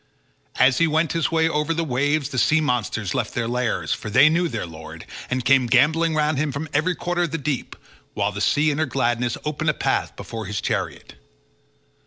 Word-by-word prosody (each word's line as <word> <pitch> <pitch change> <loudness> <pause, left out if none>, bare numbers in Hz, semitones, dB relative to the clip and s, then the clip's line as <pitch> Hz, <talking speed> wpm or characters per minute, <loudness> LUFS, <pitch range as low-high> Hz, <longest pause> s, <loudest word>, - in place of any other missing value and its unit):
As 130 0 +4
he 165 - +4
went 160 +1 +1
his 165 -2 0
way 160 0 +3
over 150 +1 0
the 165 - 0
waves 145 +1 0
the 130 - -2
sea 160 +6 +3
monsters 115 - -1
left 120 -5 -2
their 120 -1 -1
lairs, 125 -1 -1
for - - -6
they 135 +8 +6
knew 170 +2 +1
their 155 - -4
lord, 80 -2 -10 0.2
and 130 -1 -2
came 135 -2 +4
gambolling 155 +6 +3
round 150 -2 +1
him 155 -1 0
from 140 +4 -5
every 165 +5 +1
quarter 175 +1 -2
of 175 - 0
the 165 - -1
deep, 145 -2 -3 0.4
while 100 0 0
the 100 0 -6
sea 150 +6 +2
in 145 - -3
her 155 - +1
gladness 120 -1 0
opened 155 +1 -1
a 150 - +1
path - - -1
before 110 -3 -7
his 105 0 -3
chariot. - - -3
145 Hz, 210 wpm, -22 LUFS, 120-160 Hz, 0.4 s, they